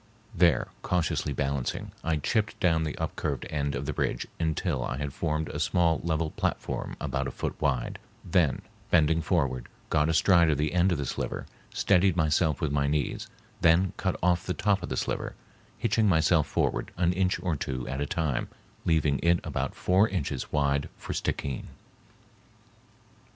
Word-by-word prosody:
There, 85 - +3
cautiously 85 -4 0
balancing, 70 -1 -2
I 80 -1 +1
chipped 105 +9 0
down 80 -4 +2
the 75 - -4
upcurved 70 -5 -3
end 70 -2 -1
of 70 - -3
the 75 - -2
bridge - - -1
until 80 -3 0
I 65 - -3
had 70 0 -4
formed 80 -1 -1
a - - -4
small 85 -2 +2
level 80 -1 0
platform - - -2
about - - -2
a - - -4
foot - - -3
wide, 65 -5 0 0.3
then, 85 -5 +2 0.3
bending 80 +1 +4
forward, 65 -5 0 0.2
got 75 0 +3
astride 85 0 +5
of 75 - +2
the 75 +2 0
end 90 +1 +3
of 85 - +1
the 70 - -2
sliver, - - -3 0.3
steadied 95 -2 +3
myself 80 0 +2
with 75 -4 0
my 70 0 +1
knees, 75 -1 -1 0.3
then 85 +3 +4
cut 95 -2 -1
off 90 -1 +3
the 90 - -1
top 100 -2 +1
of - - -5
the - - -2
sliver, - - -2 0.4
hitching 110 -2 +2
myself 80 -2 +3
forward - - 0
an 85 0 +2
inch 95 0 +1
or 90 -4 -1
two 65 -3 -4
at 65 +2 -3
a 70 - -1
time, 80 -7 -1 0.4
leaving 75 -4 +2
it 85 0 +4
about - - -3
four 95 +4 +3
inches 70 -8 -3
wide 70 -1 +1
for - - -5
Stickeen. 70 -3 -2
80 Hz, 170 wpm, -28 LUFS, 70-85 Hz, 0.4 s, astride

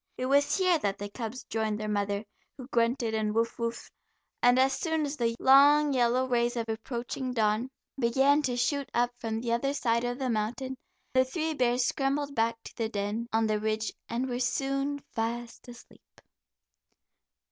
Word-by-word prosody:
It 255 - -2
was 280 +6 +3
here 365 -3 +3
that 200 -7 -1
the 205 0 -6
cubs 230 +1 -6
joined 220 -1 -2
their 215 - -3
mother, 205 0 -1 0.3
who 255 - -8
grunted 235 -1 +1
and 215 -1 -1
"woof, 230 0 +1
woofed," 235 0 -4 0.5
and 245 +1 +5
as 265 +1 +4
soon 320 -3 -1
as 285 +1 -4
the 230 -4 0
long 285 +2 +6
yellow 250 0 +2
rays 240 -1 +1
of 230 -1 -2
approaching 240 +3 -4
dawn 220 +1 +1 0.3
began 270 +4 +3
to 250 -4 -1
shoot 280 +2 0
up 240 +1 +2
from 225 0 -3
the 235 -1 -2
other 275 +4 0
side 235 -3 +1
of 245 0 -2
the 260 -2 -1
mountain, 240 +5 -2 0.4
the 260 0 +5
three 315 +4 -2
bears 250 -2 +2
scrambled 280 +2 -1
back 230 -2 +1
to - - -11
their 225 -1 -2
den 210 +2 -3
on 225 0 +2
the 215 -1 +1
Ridge, 215 0 -1 0.2
and 245 +3 -1
were 245 -1 -3
soon 275 +3 -1 0.2
fast 235 +2 -4
asleep. 240 -1 -16
240 Hz, 180 wpm, -29 LUFS, 225-270 Hz, 0.5 s, long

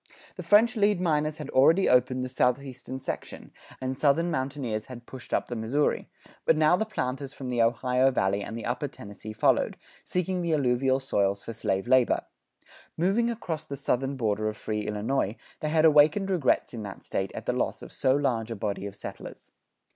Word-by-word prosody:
The - - -6
French 220 +3 +4
lead 205 -3 +3
miners 155 -3 0
had 150 -3 -7
already 160 +9 +5
opened 125 0 +3
the - - -2
southeastern 130 +1 -1
section, 130 - -6 0.3
and 130 0 -3
Southern 155 +5 +2
mountaineers 130 -6 -2
had 120 -2 -10
pushed 130 -1 -11
up - - 0
the 120 - -4
Missouri; 120 +7 0 0.3
but 160 - +3
now 155 +2 +5
the 220 +4 -1
planters 135 -7 -3
from 130 -3 -6
the 120 -1 +1
Ohio 125 +3 +3
Valley 100 -5 0
and 110 +3 -6
the 115 - -6
upper 125 +4 -1
Tennessee 105 -3 -10
followed, 110 - +2 0.3
seeking 180 0 -1
the 170 -2 +1
alluvial 130 -1 +2
soils 100 -7 0
for 115 - -6
slave 100 -1 -1
labor. 130 -1 +3 0.7
Moving 200 +8 +2
across 180 -9 -4
the 140 - -7
southern 135 0 -1
border 110 -3 0
of 105 - -7
free 105 -1 -3
Illinois, 105 +1 -1 0.2
they 155 - -2
had 160 0 +3
awakened 155 +6 +5
regrets 165 -9 +1
in 115 - -5
that 100 -2 -8
State 95 0 -2
at - - -6
the - - 0
loss - - -2
of - - -10
so 130 0 +2
large 120 -6 0
a 115 - -3
body 100 -1 -3
of 100 - -9
settlers. - - -9
130 Hz, 190 wpm, -27 LUFS, 115-155 Hz, 0.7 s, already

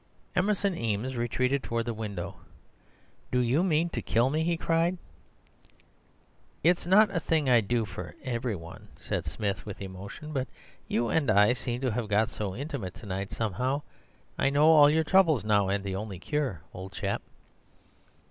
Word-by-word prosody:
"Emerson 200 0 +1
Eames 115 +1 -2
retreated 125 +3 0
towards 115 -2 -2
the 120 - -2
window. 100 -5 -5 1.0
'Do 125 - 0
you 125 +6 +2
mean 165 -2 +2
to - - -3
kill 120 +4 +2
me?' 155 +2 +1
he 170 0 +1
cried. 165 +2 +1 1.7
"'It's 175 +1 +3
not 200 +1 +5
a - - +3
thing 160 -3 0
I'd 120 -5 +4
do 120 -2 +1
for 90 -2 -8
every 120 -3 -2
one,' 85 -1 -10
said - - -4
Smith 100 -3 -2
with 105 - -8
emotion; 100 +10 -8
'but 130 -2 -1 0.4
you 115 0 0
and 150 -5 +1
I 105 +4 +5
seem 125 0 -4
to 130 -2 0
have 115 0 -2
got 105 +2 +2
so 100 -3 -4
intimate 120 - -5
to 115 - -12
night, 95 0 -3
somehow. 125 +7 -1 0.6
I 135 - +3
know 145 +2 +3
all 150 -3 +8
your 160 +2 +3
troubles 160 - +4
now, 100 -2 +3
and 100 0 0
the 95 -1 -3
only 100 -1 -5
cure, 130 - -2
old 95 +2 -8
chap. 100 -1 -2
120 Hz, 170 wpm, -28 LUFS, 100-150 Hz, 1.7 s, all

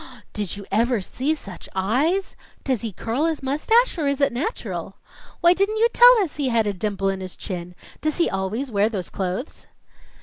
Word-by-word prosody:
"Did 205 -2 -3
you 200 - -8
ever 230 +3 +2
see 265 +10 -1
such 195 - -11
eyes!" 280 - 0 0.3
"Does 255 -6 0
he 225 - -3
curl 230 - -2
his 320 -4 -1
mustache, 355 - +2
or 295 - 0
it 280 0 0
is 280 - +3
natural?" 290 - -4 0.5
"Why 345 +1 +6
didn't 400 +4 0
you 460 +2 +4
tell - - +8
us 325 - -6
he 280 -3 0
had 230 -2 +2
a 205 - 0
dimple 195 0 -1
in 195 0 -2
his 185 -1 -7
chin?" 180 -2 -6 0.3
"Does 310 -1 -1
he 340 - +3
always 210 +8 -2
wear 205 +1 +2
those 195 -6 -5
clothes?" 190 - -4
245 Hz, 195 wpm, -23 LUFS, 195-315 Hz, 0.5 s, tell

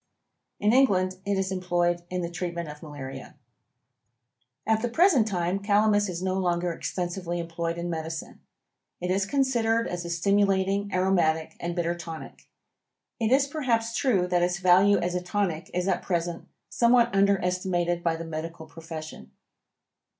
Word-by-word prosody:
In 210 +2 +3
England 185 -8 +3
it 200 -1 +1
is 190 0 -1
employed 175 -2 0
in 180 -1 -2
the 170 - -3
treatment 170 -1 -4
of 150 0 -10
malaria. 145 -4 -8 1.3
At 220 0 +2
the 240 - -1
present 280 - +4
time 180 -1 -1
Calamus 205 0 +3
is 180 0 -4
no 190 0 0
longer 175 -1 0
extensively 175 0 -3
employed 170 0 -3
in 170 0 -3
medicine. 160 -1 -5 0.6
It 180 +1 -2
is 190 +1 +1
considered 235 -3 +1
as 175 -1 -4
a 170 - -6
stimulating, 195 +2 +1
aromatic 175 -4 +1
and 170 0 -3
bitter 170 -1 0
tonic. 165 -2 -9 0.7
It 225 0 0
is 270 +1 +5
perhaps 235 -6 -1
true 205 -10 +2
that 180 -1 +1
its 175 0 +1
value 185 +2 +5
as 175 +1 -1
a 180 - -1
tonic 180 -4 -2
is 180 +1 -1
at - - +1
present 170 -2 -2 0.2
somewhat 235 -1 +3
underestimated 180 -3 +1
by 165 -1 +1
the 165 +1 -6
medical 160 0 -6
profession. 160 - -9
180 Hz, 150 wpm, -26 LUFS, 170-200 Hz, 1.3 s, is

